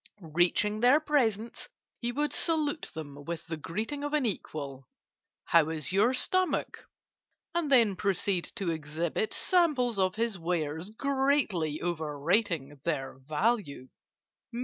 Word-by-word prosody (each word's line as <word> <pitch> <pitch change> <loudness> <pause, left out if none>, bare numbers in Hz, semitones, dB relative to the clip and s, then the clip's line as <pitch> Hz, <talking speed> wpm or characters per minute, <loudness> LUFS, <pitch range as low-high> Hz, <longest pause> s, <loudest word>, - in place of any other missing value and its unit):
Reaching 180 +5 +2
their 250 +6 +6
presence, 235 - 0 0.3
he 240 0 -2
would 295 +4 -1
salute 310 -2 0
them 145 -2 -7
with 170 +1 -5
the 165 - -4
greeting 215 - -4
of 290 +1 -3
an 295 -4 +1
equal, 140 - -4 0.6
'How 165 -2 +4
is 155 -2 -3
your 205 +6 +4
stomach?' 370 +8 0 0.7
and 335 -4 -1
then 230 -7 +5
proceed 190 -1 0
to 195 -7 -1
exhibit 160 +6 -2
samples 275 - +2
of 185 -1 +2
his 225 -3 -1
wares, 165 0 -2
greatly 265 - 0
overrating 160 -1 0
their 135 -5 -2
value. 150 - -1
195 Hz, 125 wpm, -29 LUFS, 160-250 Hz, 0.7 s, their